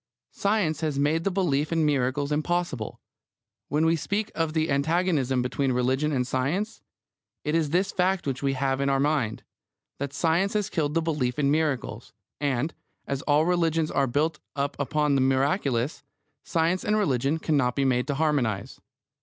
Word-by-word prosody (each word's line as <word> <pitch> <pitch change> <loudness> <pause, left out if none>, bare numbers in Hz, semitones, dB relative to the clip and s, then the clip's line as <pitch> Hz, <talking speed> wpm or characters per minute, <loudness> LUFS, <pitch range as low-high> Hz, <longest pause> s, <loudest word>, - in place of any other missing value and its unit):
Science 200 -7 0
has 155 -3 -1
made 150 +4 +1
the 195 - +1
belief 160 -6 0
in 165 -2 +2
miracles 140 0 0
impossible. 155 - -1 0.7
When 150 +2 +1
we 165 +1 +4
speak 200 +7 -2
of 165 -1 -1
the 160 -2 0
antagonism 140 -3 +1
between 135 +1 0
religion 130 +5 +1
and 125 -3 0
science, 145 - -2 0.6
it 150 - -1
is 160 -3 +1
this 185 +5 +1
fact 185 0 +1
which 135 -2 -2
we 135 -1 +1
have 135 0 0
in 140 - +1
our 135 0 +2
mind: 140 -6 0 0.6
that 140 0 -3
science 165 +7 +1
has 210 -1 -1
killed 150 -3 -1
the 165 - +2
belief 150 -6 -1
in 140 -2 +2
miracles, 150 -5 -1 0.3
and, 145 +1 0 0.3
as 140 -1 -3
all 150 +1 +4
religions 165 -3 +1
are 135 - +2
built 150 +6 0 0.2
up 140 0 -1
upon 150 +1 +1
the 135 - +3
miraculous, 135 - +1 0.4
science 170 +3 0
and 210 0 +1
religion 140 - +1
cannot 140 -6 +1
be 140 - +1
made 125 -1 +1
to 140 - -1
harmonise. 135 -8 -1
150 Hz, 170 wpm, -26 LUFS, 135-165 Hz, 0.7 s, we